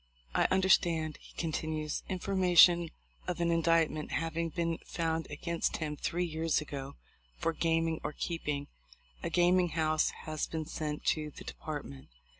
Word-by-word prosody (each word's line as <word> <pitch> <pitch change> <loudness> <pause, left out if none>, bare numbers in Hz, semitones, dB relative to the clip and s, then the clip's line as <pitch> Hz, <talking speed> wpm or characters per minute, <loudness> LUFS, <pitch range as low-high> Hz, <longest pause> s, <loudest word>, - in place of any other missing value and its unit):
I - - +3
understand," 170 -5 +3
he - - -16
continues, 155 -2 -2
"information 180 -2 +5 0.4
of 180 -1 -2
an 170 0 +2
in 165 0 +2
dictment 165 -2 +2
having 165 +1 -1
been 165 +1 -1
found 165 -1 -2
against 165 +3 -2
him 150 -2 -3
three 175 +4 -1
years 160 -1 0
ago 140 -2 -6 0.4
for 165 - 0
gaming 165 0 +1
or - - -2
keeping 150 -3 -3 0.6
a. - - -2
gaming 180 0 +4
house 155 -1 +2 0.2
has 155 -1 -2
been 160 -1 -3
sent 150 0 -4
to 155 -1 0
the - - -11
Department." 145 -3 -7
165 Hz, 145 wpm, -32 LUFS, 155-170 Hz, 0.6 s, information